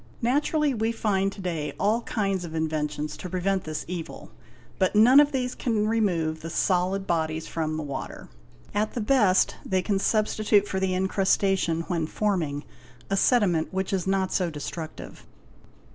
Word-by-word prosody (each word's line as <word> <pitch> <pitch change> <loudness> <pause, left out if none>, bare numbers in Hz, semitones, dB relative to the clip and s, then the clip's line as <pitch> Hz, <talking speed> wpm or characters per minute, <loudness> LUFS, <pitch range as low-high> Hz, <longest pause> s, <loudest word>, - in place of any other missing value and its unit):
Naturally 290 +3 +2
we 225 -1 0
find 195 -4 0
to 195 - -10
day 165 -5 -3
all 215 +4 +2
kinds 195 -5 -1
of 165 -2 -7
inventions 150 -1 -2
to 180 - -7
prevent 190 +1 -1
this 155 -1 -4
evil; 170 -2 -7 0.5
but 190 +1 +2
none 245 +6 +7
of 295 0 +5
these 250 -2 -1
can 215 -3 0
remove 175 -8 0
the 165 - -6
solid 185 +3 0
bodies 160 -2 -1
from 155 -1 -3
the 155 - -3
water, 140 -2 -6 0.5
at 210 +1 0
the - - -1
best 210 -5 +3
they 185 -1 0
can 200 -1 0
substitute 215 -1 +2
for 190 - -2
the 190 -1 0
incrustation, 190 -2 +1
when 165 -2 -2
forming, 165 -8 -1 0.5
a - - +3
sediment 195 -7 +2
which 190 0 -2
is 190 -1 -1
not 190 -1 0
so 180 -3 +1
destructive. 155 +1 -7
190 Hz, 160 wpm, -26 LUFS, 165-210 Hz, 0.5 s, none